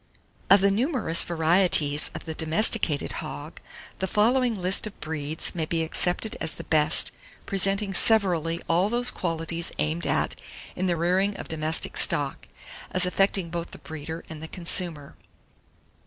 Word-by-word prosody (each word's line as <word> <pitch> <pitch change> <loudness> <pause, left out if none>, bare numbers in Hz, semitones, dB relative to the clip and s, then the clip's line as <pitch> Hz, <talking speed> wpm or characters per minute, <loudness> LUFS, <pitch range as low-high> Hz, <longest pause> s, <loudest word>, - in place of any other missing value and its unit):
778. - - +9
OF 200 - +1
THE 200 +4 +2 0.2
NUMEROUS 165 -6 +3
VARIETIES 160 -3 +2
OF - - -8
THE 160 - -5
DOMESTICATED 160 -1 +2
HOG, 70 - -8 0.4
the 190 - -2
following 230 +3 +1
list 185 +4 +2
of 210 - -12
breeds 155 0 -2
may 160 -3 -3
be 165 0 -1
accepted 180 +6 0
as 160 - -1
the - - -8
best, 155 0 +3 0.3
presenting 195 +1 +1
severally 175 -6 +2
all 180 +4 +2
those 240 +2 +3
qualities 165 -1 -3
aimed 160 +3 -2
at - - -2 0.3
in 185 +1 -2
the 175 -1 0
rearing 185 +4 0
of - - -8
domestic 160 0 0
stock, - - +1 0.4
as 185 0 +3
affecting 190 -1 0
both 170 0 -5
the - - -12
breeder 160 +1 -8
and 155 -1 -10
the 160 - -7
consumer. 170 -4 -3
170 Hz, 155 wpm, -25 LUFS, 160-195 Hz, 0.4 s, 778